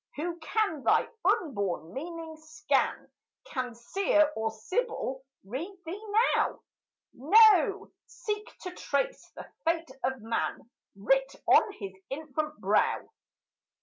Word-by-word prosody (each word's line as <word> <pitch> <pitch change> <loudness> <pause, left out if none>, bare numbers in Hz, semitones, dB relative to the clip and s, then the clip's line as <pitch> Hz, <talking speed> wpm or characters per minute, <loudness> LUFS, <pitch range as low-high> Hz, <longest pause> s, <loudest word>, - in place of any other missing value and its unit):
Who 340 +3 -3
can 330 -1 0
thy - - +3 0.2
unborn 200 - 0
meaning 325 +2 -6
scan? 315 0 -1 0.3
Can 250 -2 -4
Seer 310 +4 +2
or 220 0 0
Sibyl 270 - -3 0.2
read 315 - -5
thee 380 +6 -6 0.3
now? - - 0 0.5
No, 400 - +5 0.2
seek 420 -3 -5
to 365 - -5
trace - - -2
the - - -8 0.2
fate 330 -3 0
of 260 -3 -1
man 230 +1 -2 0.3
Writ 270 +7 +2
on 430 - +6
his 195 - -7 0.2
infant 305 +1 -4
brow. - - +1
310 Hz, 115 wpm, -29 LUFS, 255-380 Hz, 0.5 s, on